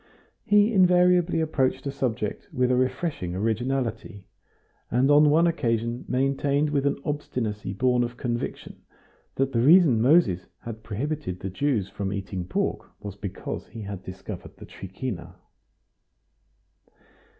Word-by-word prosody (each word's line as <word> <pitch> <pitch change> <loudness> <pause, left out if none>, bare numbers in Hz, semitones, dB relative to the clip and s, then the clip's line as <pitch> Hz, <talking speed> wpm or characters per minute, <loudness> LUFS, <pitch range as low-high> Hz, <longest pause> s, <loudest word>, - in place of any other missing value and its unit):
He 210 +2 +4
invariably 180 -2 +4
approached 145 -5 0
a 140 - -1
subject 125 -6 -3
with 125 0 +1
a - - +3
refreshing 130 - -1
originality, 115 -1 -2 0.6
and 130 +4 +3
on 150 +1 +6
one 160 +3 +4
occasion 120 -7 -1
maintained 140 +3 +1
with 140 -1 +1
an 140 - 0
obstinacy 115 -9 -3
born 125 +3 +2
of 120 0 -5
conviction 120 -2 -4 0.5
that 135 0 0
the 115 - +2
reason 150 -4 +6
Moses 125 - +3
had 110 -1 -7
prohibited 125 - -4
the 95 - -4
Jews 115 -2 0
from 100 -1 -4
eating 95 -2 -4
pork - - -2
was 100 -2 -7
because 100 -2 -6
he 115 -1 -9
had 100 -2 -6
discovered 95 +1 -9
the - - -10
trichina. 95 +2 -7
125 Hz, 130 wpm, -25 LUFS, 105-145 Hz, 0.6 s, on